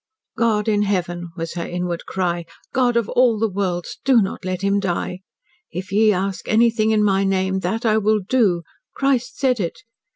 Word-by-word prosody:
"God 225 -2 +1
in 210 -1 +2
Heaven!" 175 -4 -1
was 165 -1 -4
her 170 - -3
inward 175 -1 -4
cry. 175 -2 -1 0.3
"God 245 -2 +2
of 230 -3 +1
all 245 -3 +3
the 225 +1 +1
worlds! 185 -3 -3
Do 265 -3 +5
not 195 -2 -2
let 185 0 -3
him 200 0 +2
die. 180 -1 -2 0.5
'If 190 +2 -6
ye 215 +2 +4
ask 195 0 -2
anything 225 0 +3
in 215 -1 +3
my 195 -1 +2
name 190 0 0
that 220 +7 -2
I 220 -1 +3
will 215 +1 +2
do.' 205 -10 +2 0.3
Christ 275 -3 0
said 255 -4 +1
it. 170 -4 -3
200 Hz, 185 wpm, -21 LUFS, 180-225 Hz, 0.5 s, Do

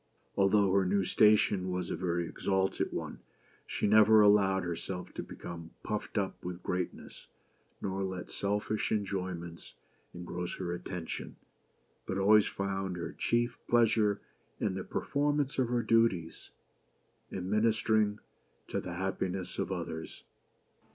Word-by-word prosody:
Although 100 0 +4
her 100 -1 +4
new 95 +1 +1
station 105 -2 +4
was 90 0 -2
a - - 0
very 85 -2 -1
exalted 95 +2 0
one, - - -5 0.5
she - - -2
never 110 +1 +7
allowed 100 -2 +5
herself 90 +1 -5
to - - -4
become 85 -1 -8
puffed 105 +1 -3
up 95 -2 -2
with 90 0 -6
greatness, 90 -1 -4 0.6
nor 95 0 -1
let 95 -1 -5
selfish 105 +1 -1
enjoyments 95 -5 -3 0.4
engross 90 0 -5
her 90 -2 -3
attention, 90 -1 -5 0.7
but 95 - -2
always 105 +2 +5
found 95 -2 -3
her 85 - -4
chief 120 +1 0
pleasure 110 -3 +3 0.4
in 100 - 0
the 95 0 -4
performance 145 -1 0
of 130 - +3
her 120 -1 +1
duties, 110 -7 +1 0.8
and 95 - -4
in 90 - -5
ministering 110 -1 +2 0.5
to - - -1
the 90 -1 -6
happiness 95 0 -3
of - - -1
others. 80 0 -5
95 Hz, 130 wpm, -31 LUFS, 90-105 Hz, 0.8 s, never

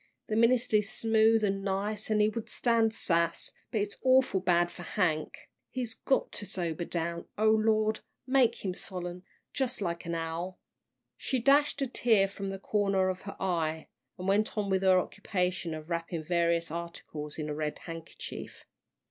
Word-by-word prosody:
The 215 - 0
minister 235 0 +4
is 210 -1 0
smooth 225 -1 +4
an' 195 -1 0
nice, 205 +2 -1
an' 215 -1 +3
he 210 - +4
would 225 0 -5
stand 230 -2 +2
sass, 170 -6 0 0.2
but 215 - 0
it's 205 0 -4
awful 260 -6 +4
bad 175 -2 +2
for - - -10
Hank. 170 -5 -1 0.2
He's 245 -3 -2
got 265 +4 0
to 205 - -4
sober 170 -2 -2
down. 170 0 -3
O 215 +1 +4
Lord, 215 0 +2 0.3
make 255 -5 +2
him 185 - 0
solemn 180 -1 -5 0.3
jus' 260 -2 -1
like 170 -3 -3
an 170 - -2
owl!" 165 +3 -4 0.6
She 260 - -1
dashed 280 +3 +4
a - - 0
tear 225 -5 +3
from 195 0 -6
the 195 0 -4
corner 195 -1 +1
of 185 0 -3
her - - -7
eye, 160 -4 -1 0.3
and 185 - -5
went 210 +3 +1
on 200 -2 0
with 190 0 +2
her 190 -1 +5
occupation 180 -3 -1
of 155 +2 -9
wrapping 170 -1 -2
various 170 0 +1
articles 160 -3 -6
in 155 -1 -3
a 150 - -2
red 150 0 -3
handkerchief. 165 -1 -8
195 Hz, 175 wpm, -30 LUFS, 170-220 Hz, 0.6 s, her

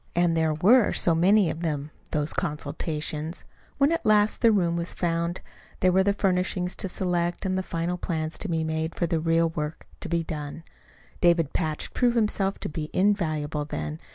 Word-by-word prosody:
And 175 -1 +3
there 160 -1 +1
were 215 +9 +5
so 170 - +3
many 185 +2 +4
of 160 - -6
them 150 -3 -3 0.2
those 150 +1 0
consultations! 155 0 -2 0.3
When 280 +2 +3
at 335 0 0
last 210 0 +3
the 230 - +6
room 175 -5 +2
was 170 0 -3
found, 170 0 -1 0.4
there 185 - +3
were 190 +1 +4
the 200 +1 +3
furnishings 180 -2 0
to 190 - -2
select, 175 -1 -1
and 185 -1 0
the 190 - 0
final 175 0 -3
plans 160 -2 -3
to 205 - 0
be 165 -1 0
made 160 +1 -2
for 175 - 0
the 165 -1 0
real 165 +1 +2
work 150 -1 -5
to - - -6
be 170 0 0
done. 150 0 -6 0.6
David 170 -4 +3
Patch 155 -3 -2
proved 245 -1 +2
himself 210 -3 +1
to - - -3
be 150 0 -5
invaluable 155 -7 0
then. 75 - -5
170 Hz, 185 wpm, -26 LUFS, 155-185 Hz, 0.6 s, the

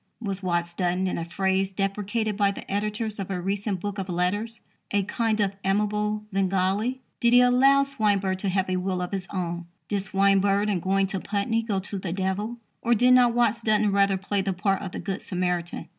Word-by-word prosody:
Was 200 -4 -4
Watts 175 -2 -1
Dunton, 180 +1 0
in 185 - -2
a 165 - -3
phrase 190 +1 0
deprecated 205 +3 -1
by 200 -1 +3
the 200 - -7
editors 210 +1 -2
of 195 - -4
a 190 -2 -2
recent 195 +1 -2
book 205 +2 -4
of 190 0 -4
letters, 205 +6 -1 0.3
a 200 -1 +1
"kind 220 +2 -1
of 200 -2 +1
amiable 210 +2 0
Svengali"? 195 +6 0 0.2
Did 235 0 +3
he 245 - +8
allow 265 +3 +5
Swinburne 205 -8 0
to 195 +1 -2
have 190 0 0
a 185 0 0
will 185 0 -1
of 180 0 -3
his 190 -2 -3
own? 175 -2 -3 0.2
Did 200 -1 -1
Swinburne, 195 +1 +2
in 195 -3 +1
going 195 +2 +1
to 195 0 -3
Putney, 210 +4 -1
go 220 -3 -2
to 190 +1 -4
the 185 -2 -4
Devil? 195 +5 -2 0.2
Or 240 0 +3
did 250 +3 +5
not 245 -2 +5
Watts 235 -1 +2
Dunton 215 -2 +2
rather 200 -1 +3
play 195 +1 -1
the 195 0 -1
part 195 +1 0
of 190 - -5
the - - -5
good 195 -2 -4
Samaritan? 180 -3 -2
195 Hz, 205 wpm, -26 LUFS, 190-215 Hz, 0.3 s, he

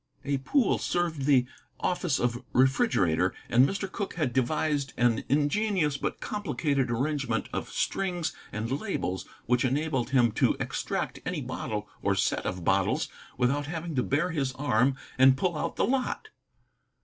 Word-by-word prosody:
A 140 -1 0
pool 255 - +2
served 165 -6 -1
the 135 -4 +5 0.3
office 175 -5 0
of 120 +1 -1
refrigerator, 100 - +3
and 125 +3 +5
Mr. 195 0 -2
Cooke 200 - -4
had 150 -8 -1
devised 140 +2 0
an 120 -2 +2
ingenious 150 - +2
but - - -3
complicated 145 -9 -1
arrangement 130 -1 -1
of - - -3
strings 180 -4 -1 0.2
and 115 +7 -2
labels 95 - -3 0.2
which 125 +1 +2
enabled 135 -1 0
him 120 -4 +4
to 105 - +2
extract - - -2
any - - -2
bottle 105 -1 -4
or 100 - +1
set 95 - 0
of 90 -1 -4
bottles - - +2 0.3
without 135 +4 +1
having 165 +1 -4
to 130 - +1
bare 150 +8 0
his 135 -5 -1
arm 130 -1 +2 0.2
and 130 0 +7
pull 175 +3 0
out 150 - -2
the - - +2
lot. 270 - -1
140 Hz, 150 wpm, -28 LUFS, 125-165 Hz, 0.3 s, and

